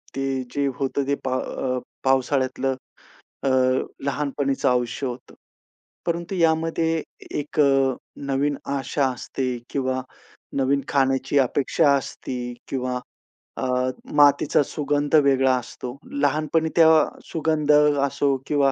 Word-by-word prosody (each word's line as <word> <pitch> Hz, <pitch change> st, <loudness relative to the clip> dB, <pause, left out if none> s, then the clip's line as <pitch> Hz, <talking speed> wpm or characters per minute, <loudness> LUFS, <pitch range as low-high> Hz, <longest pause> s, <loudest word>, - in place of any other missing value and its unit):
ते 135 Hz, -1 st, -1 dB
जे 140 Hz, -1 st, +1 dB
होतं 135 Hz, 0 st, -1 dB
ते 140 Hz, -, +2 dB
अ, 130 Hz, 0 st, -2 dB, 0.3 s
पावसाळ्यातलं 130 Hz, 0 st, +1 dB, 0.7 s
अ, 135 Hz, -, +2 dB, 0.6 s
लहानपणीचं 140 Hz, -1 st, 0 dB
आयुष्य 125 Hz, +2 st, 0 dB
होतं. 125 Hz, 0 st, -8 dB, 0.7 s
परंतु 170 Hz, +2 st, -2 dB
यामध्ये 165 Hz, -1 st, +1 dB, 0.4 s
एक 150 Hz, +1 st, -5 dB
अ, 135 Hz, -2 st, +3 dB, 0.3 s
नवीन 140 Hz, +1 st, 0 dB, 0.2 s
आशा 135 Hz, +1 st, 0 dB
असते 125 Hz, +1 st, -3 dB
किंवा 130 Hz, -1 st, -1 dB, 0.6 s
नवीन 135 Hz, +1 st, +2 dB
खाण्याची 135 Hz, 0 st, +1 dB
अपेक्षा 140 Hz, +3 st, +2 dB
असते 130 Hz, -1 st, -4 dB, 0.3 s
किंवा 125 Hz, -1 st, -2 dB, 0.6 s
अ, -, -, -3 dB, 0.5 s
मातीचा 145 Hz, 0 st, +5 dB
सुगंध 145 Hz, +1 st, -1 dB
वेगळा 135 Hz, -3 st, +4 dB
असतो. 125 Hz, 0 st, -7 dB, 0.2 s
लहानपणी 155 Hz, +3 st, +1 dB
त्या 165 Hz, -, +7 dB, 0.2 s
अ, -, -, +2 dB, 0.2 s
सुगंध 155 Hz, -2 st, 0 dB, 0.4 s
असो 140 Hz, 0 st, +1 dB
किंवा 140 Hz, -2 st, +3 dB
140 Hz, 110 wpm, -23 LUFS, 130-145 Hz, 0.7 s, त्या